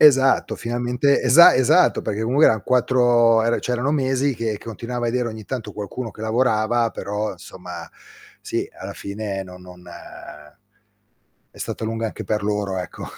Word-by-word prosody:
Esatto, 135 Hz, -3 st, +4 dB
finalmente 120 Hz, +3 st, 0 dB
esa 130 Hz, +7 st, +7 dB
esatto, 140 Hz, +8 st, +3 dB
perché 105 Hz, -, -3 dB, 0.2 s
eran 110 Hz, -8 st, +4 dB
4 120 Hz, -2 st, +3 dB
ehm, 115 Hz, +1 st, +1 dB
cioè 125 Hz, -, -3 dB
erano 125 Hz, +4 st, 0 dB
mesi 135 Hz, -1 st, 0 dB
che 115 Hz, -2 st, -3 dB
che -, -, -17 dB
continuava 120 Hz, +2 st, -5 dB
a -, -, 0 dB
vedere 120 Hz, 0 st, -1 dB
ogni 110 Hz, -1 st, -8 dB
tanto 125 Hz, +1 st, -5 dB
qualcuno 110 Hz, +3 st, -6 dB
che 105 Hz, -, -15 dB
lavorava, 115 Hz, 0 st, +1 dB
però 105 Hz, +1 st, -4 dB
insomma, -, -, -10 dB, 0.5 s
sì, -, -, -3 dB
alla -, -, -7 dB
fine 100 Hz, -1 st, -5 dB
no 90 Hz, -1 st, -11 dB
non 90 Hz, -1 st, -14 dB, 1.6 s
è -, -, -24 dB
stata -, -, -5 dB
lunga 115 Hz, +1 st, -2 dB
anche 110 Hz, -, -7 dB
per 105 Hz, -1 st, -1 dB
loro, 105 Hz, -2 st, -2 dB
ecco. 90 Hz, -, -7 dB
115 Hz, 160 wpm, -21 LUFS, 105-125 Hz, 1.6 s, esa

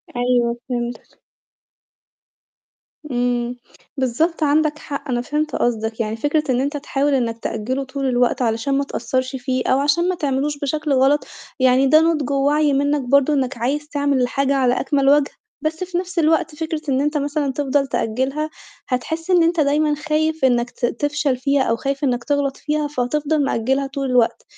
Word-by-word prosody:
أيوه، 245 Hz, -1 st, +1 dB
فهمتك. 240 Hz, -1 st, -5 dB, 1.9 s
إمم. 245 Hz, 0 st, 0 dB, 0.4 s
بالضبط 310 Hz, +6 st, 0 dB
عندَك 305 Hz, +1 st, +2 dB
حق، 280 Hz, -1 st, -6 dB
أنا 240 Hz, -1 st, 0 dB
فهمت 300 Hz, +4 st, -2 dB
قصدَك. 225 Hz, -1 st, -1 dB
يعني 220 Hz, -1 st, -1 dB
فكرة 295 Hz, +5 st, 0 dB
إن 250 Hz, 0 st, +2 dB
أنت 285 Hz, +2 st, -2 dB
تحاول 285 Hz, 0 st, 0 dB
إنك 230 Hz, -3 st, 0 dB
تأجله 240 Hz, +5 st, -3 dB
طول 275 Hz, +1 st, -4 dB
الوقت 245 Hz, -1 st, +1 dB
علشان 235 Hz, +4 st, 0 dB
ما 280 Hz, -, +1 dB
تقصَّرش 255 Hz, 0 st, -2 dB
فيه، 255 Hz, 0 st, -2 dB
أو 260 Hz, -, +3 dB
عشان 340 Hz, +6 st, +2 dB
ما 370 Hz, -, 0 dB
تعملوش 285 Hz, -1 st, -1 dB
بشكل 300 Hz, 0 st, -1 dB
غلط، 270 Hz, +3 st, +3 dB, 0.3 s
يعني 260 Hz, +1 st, +4 dB
ده 310 Hz, +3 st, +6 dB
نُضج 315 Hz, -5 st, +1 dB
ووعي 285 Hz, +1 st, +2 dB
منك 285 Hz, +1 st, +1 dB
برضه، 280 Hz, +3 st, +3 dB
إنك 265 Hz, -2 st, -1 dB
عايز 285 Hz, +6 st, -1 dB
تعمل 285 Hz, -2 st, +1 dB
الحاجة 275 Hz, +2 st, +1 dB
على 255 Hz, -2 st, +2 dB
أكمل 275 Hz, 0 st, +2 dB
وجه. 290 Hz, -1 st, +4 dB, 0.3 s
بس 315 Hz, +3 st, -2 dB
في 360 Hz, -1 st, -3 dB
نفس 360 Hz, -1 st, -2 dB
الوقت 320 Hz, 0 st, +2 dB
فكرة 315 Hz, 0 st, -3 dB
إن 265 Hz, 0 st, +2 dB
أنت 295 Hz, +1 st, 0 dB
مثلًا 285 Hz, -1 st, -1 dB
تفضل 275 Hz, 0 st, 0 dB
تأجلها، 265 Hz, +8 st, -1 dB, 0.4 s
هتحس 320 Hz, +7 st, -3 dB
إن 350 Hz, -2 st, +5 dB
أنت 335 Hz, 0 st, +1 dB
دايمًا 300 Hz, +1 st, +2 dB
خايف 310 Hz, 0 st, 0 dB
إنك 240 Hz, -1 st, +2 dB
ت 245 Hz, -, -2 dB
تفشل 290 Hz, +1 st, -1 dB
فيها، 275 Hz, +1 st, +1 dB
أو 230 Hz, -, +1 dB
خايف 275 Hz, +4 st, -3 dB
إنك 245 Hz, -3 st, 0 dB
تغلط 285 Hz, 0 st, 0 dB
فيها. 300 Hz, -1 st, -1 dB
فهتفضل 290 Hz, +3 st, 0 dB
مأجلها 265 Hz, +3 st, 0 dB
طول 270 Hz, -1 st, -3 dB
الوقت، 245 Hz, -2 st, +2 dB
275 Hz, 170 wpm, -20 LUFS, 250-300 Hz, 1.9 s, ده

